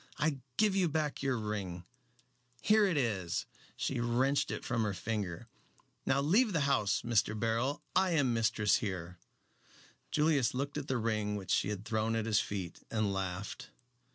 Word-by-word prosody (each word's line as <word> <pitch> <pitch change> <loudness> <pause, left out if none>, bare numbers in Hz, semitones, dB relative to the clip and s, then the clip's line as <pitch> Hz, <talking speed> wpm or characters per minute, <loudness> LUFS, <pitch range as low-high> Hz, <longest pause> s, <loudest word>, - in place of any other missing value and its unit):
I 150 -3 0 0.2
give 210 -2 +3
you 185 -3 +3
back 150 -1 -1
your 135 -2 +1
ring 100 -5 -4 0.7
here 215 0 +4
it 175 -5 0
is!" 100 -10 -1 0.3
She 130 - -1
wrenched 125 +4 +1
it - - -4
from 115 -2 0
her 105 -3 0
finger. 105 -1 -3 0.6
"Now 140 - +3
leave 205 - +3
the 165 - +2
house, 130 -8 +2
Mr. 110 -2 +1
Beryl. 115 +5 0
I 190 -2 +3
am 140 -6 +3
mistress 110 -2 +3
here." 90 -4 -5 0.9
Julius 150 -6 +2
looked 140 +3 -2
at 145 - -7
the 130 - 0
ring 110 -2 0
which 100 -2 -4
she - - +2
had 105 0 -4
thrown 110 0 0
at 110 -1 -1
his 110 -2 +3
feet, 95 -4 -4
and 110 -3 0
laughed. 95 +1 -4
115 Hz, 165 wpm, -33 LUFS, 105-140 Hz, 0.9 s, here